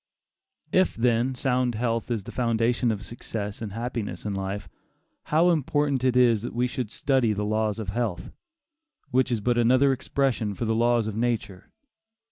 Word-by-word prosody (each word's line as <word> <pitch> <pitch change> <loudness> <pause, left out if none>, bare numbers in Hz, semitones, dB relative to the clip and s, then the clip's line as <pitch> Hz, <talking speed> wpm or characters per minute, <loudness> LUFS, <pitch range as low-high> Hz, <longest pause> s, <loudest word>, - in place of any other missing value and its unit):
If, 185 0 +3
then, 120 +2 +1
sound 125 -1 0
health 115 +1 -1
is 115 -4 -1
the 120 - -8
foundation 120 0 +1
of 110 -1 -2
success 105 -3 -6
and 110 -3 -4
happiness 115 -6 -4
in 105 - -2
life, 95 +1 -4 0.6
how 165 +4 +4
important 145 -3 0
it 125 -1 +2
is 120 -4 +4
that 120 - -6
we 120 +1 +2
should 125 -2 -3
study 130 -2 +1
the 105 0 -2
laws 110 0 0
of 110 -4 -4
health, 100 -5 -3 0.8
which 130 0 +2
is 115 -3 0
but 120 +2 +1
another 130 +4 +4
expression 130 -5 -1
for 115 - -3
the 110 - +1
laws 120 0 +2
of 110 -1 -4
nature! 110 -5 -2
120 Hz, 170 wpm, -26 LUFS, 110-125 Hz, 0.8 s, how